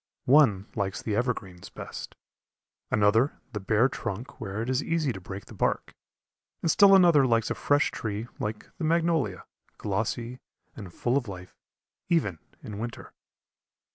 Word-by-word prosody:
One 120 -8 +5
likes 100 -3 -2
the 105 - -1
evergreens 105 -7 -3
best, - - -8 0.7
another 110 +6 +3 0.2
the 105 - -2
bare 110 +5 +3
trunk 120 -2 -6
where 105 +1 -3
it - - -5
is 130 +1 +1
easy 160 -6 0
to 95 - -8
break 95 +2 -8
the - - -13
bark, - - -1 0.7
and 165 - +3
still 195 +2 +7
another 170 -8 +6
likes 115 -2 +2
a - - +3
fresh 145 0 +2
tree 110 +1 -4
like 105 0 -5
the - - -3
magnolia, 160 - +1 0.3
glossy 115 +4 -2 0.4
and 100 -5 -9
full 120 +8 0
of 130 -4 -2
life 90 -2 -9 0.5
even 100 - +1 0.2
in 105 -1 -7
winter. 120 +1 -6
115 Hz, 150 wpm, -27 LUFS, 100-140 Hz, 0.7 s, still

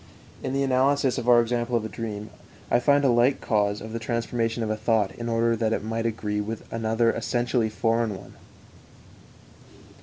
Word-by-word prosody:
In 130 - -3
the 140 0 +1
analysis 135 0 +2
of 120 - -2
our 120 -1 +7
example 120 +1 0
of 115 -2 0
a - - -2
dream, 110 -2 -6 0.4
I 120 - +5
find 140 +2 +3
a - - +5
like 120 +3 +3
case 105 -2 0
of 110 0 -8
the 115 - -3
transformation 115 0 -2
of 110 - -1
a - - 0
thought 110 -2 +1
in 120 0 -6
order 115 0 +2
that 110 0 0
it - - -2
might 115 +1 -2
agree 105 -2 -2
with 110 +2 -5
another 115 +1 +1
essentially 120 0 0
foreign 115 0 0
one. - - -13
115 Hz, 185 wpm, -25 LUFS, 110-120 Hz, 0.4 s, our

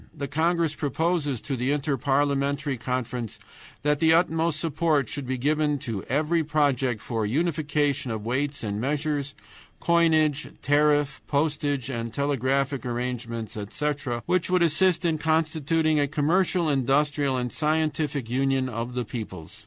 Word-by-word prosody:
The 140 - -3
congress 165 +2 +1
proposes 150 -3 -1
to 140 - -3
the 125 +1 -1
Inter 145 0 0
parliamentary 140 +1 0
Conference 125 -2 -3 0.5
that 150 0 +2
the 160 +1 +5
utmost 165 -2 +2
support 160 -2 +1
should 145 -4 -5
be 130 0 -1
given 150 +2 +1
to 115 -7 -4
every 155 +5 +1
project 140 -6 +1
for 115 0 -3
unification 145 +1 0
of 110 -2 -4
weights 140 +4 -1
and 105 0 -2
measures, 145 +1 -1 0.4
coinage, 160 -4 +3 0.2
tariff, 145 -1 +2
postage, 145 -2 0
and 115 -2 -3
telegraphic 140 0 0
arrangements, 120 -2 -4
etc., 120 +3 -3
which 185 -1 +1
would 180 -1 +3
assist 175 +2 +2
in 160 -2 +1
constituting 160 0 +1
a 145 - +2
commercial, 170 +4 +1
industrial, 140 0 +1
and 125 -1 -2
scientific 150 -3 0
union 135 +1 +1
of 120 +1 -4
the 125 -1 -1
peoples. 105 -3 -7
145 Hz, 135 wpm, -26 LUFS, 125-155 Hz, 0.5 s, the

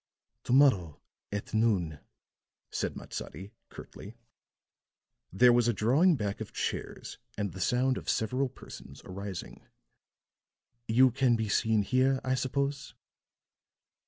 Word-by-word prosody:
"To - - 0
morrow, 105 - +4 0.3
at 100 +2 -5
noon," 95 -9 +1 0.7
said - - -2
Matsadi, 95 +7 -8 0.2
curtly. 110 +4 -11 1.1
There 120 +6 +5
was 120 -1 +3
a 120 - +2
drawing 140 - +3
back 105 -6 -3
of - - -6
chairs - - -5 0.2
and 100 -2 -2
the 95 - -8
sound 125 +8 +1
of - - -7
several 125 +4 0
persons 130 - -12
arising. 95 0 -7 1.2
"You 125 +3 +5
can 125 -1 +2
be 110 -2 -2
seen 110 0 +2
here, 130 +4 +2
I 130 - 0
suppose?" 140 +2 -2
115 Hz, 120 wpm, -30 LUFS, 100-130 Hz, 1.2 s, There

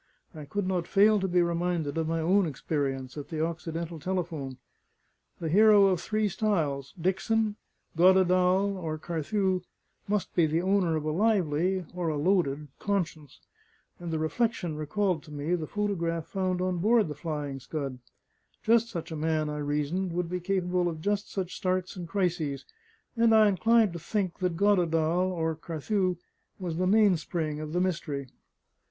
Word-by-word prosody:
I 155 -2 -8
could 200 +5 -2
not 180 -3 -1
fail 210 +1 +5
to 190 - -1
be 175 -1 +3
reminded 170 -3 -1
of 160 -1 -1
my 165 0 0
own 185 +3 +3
experience 135 -2 -3
at 145 - -7
the 160 -1 -1
Occidental 165 0 -5
telephone. 160 -6 -3 0.8
The 165 - -3
hero 205 +4 +6
of 185 -3 +2
three 215 +1 0
styles, 160 -10 -1
Dickson, 205 +5 0 0.4
Goddedaal, 185 +2 +4
or 160 -3 -3
Carthew, 185 +4 -1 0.5
must 205 -1 -1
be 170 -3 +3
the 155 +2 +1
owner 190 -3 +2
of 155 -1 -2
a 155 - 0
lively 185 -2 +1
or 175 -2 -2
a 155 - -1
loaded 150 -4 +1
conscience, 170 - -3 0.6
and 175 -1 -6
the 160 - -1
reflection 175 +1 -1
recalled 160 +3 -1
to 150 - -13
me 150 +3 -2
the 165 -3 -1
photograph 170 -6 -2
found 185 -2 -1
on 185 -1 -1
board 220 +2 +3
the 150 - -4
Flying 150 -4 -4
Scud; 135 -1 -5 0.6
just 230 +1 +3
such 170 -4 -6
a - - -3
man, 155 -1 0
I 150 - -4
reasoned, 150 +5 -1
would 175 -1 -2
be 180 - -1
capable 180 -1 0
of 160 -2 -6
just 205 +2 -1
such 185 -2 -3
starts 185 -1 -1
and 175 -2 -6
crises, 165 -7 -1 0.5
and 230 -1 +4
I 215 -1 +7
inclined 220 +1 +3
to 170 - -5
think 190 +1 -2
that 180 -3 -1
Goddedaal 175 -3 +2
(or 160 -2 -1
Carthew) 180 +4 -1 0.4
was 175 -4 -4
the 185 +1 +1
mainspring 175 -7 +2
of 155 0 -5
the 175 - 0
mystery. 165 -6 -2
175 Hz, 165 wpm, -28 LUFS, 155-195 Hz, 0.8 s, I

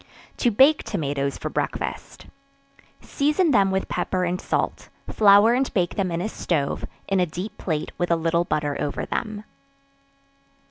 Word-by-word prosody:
To 245 - +2
Bake 270 +8 +5
Tomatoes 140 -2 -2
for - - -4
Breakfast. - - -4 0.8
Season 300 +4 +1
them 200 -6 +4
with 190 0 -1
pepper 185 -1 -1
and 180 +1 -2
salt; - - -2 0.2
flour 205 +2 +5
and 260 +2 0
bake 175 -3 +1
them 195 -3 -1
in 170 0 -2
a 190 - -1
stove, 160 -9 -2 0.2
in 195 -1 +1
a 180 - +2
deep 190 +6 -6
plate 155 -3 -3
with 175 - 0
a 170 - +4
little 165 +1 +1
butter 150 -4 -1
over 145 - -2
them. 215 -1 -4
185 Hz, 155 wpm, -23 LUFS, 165-215 Hz, 0.8 s, Bake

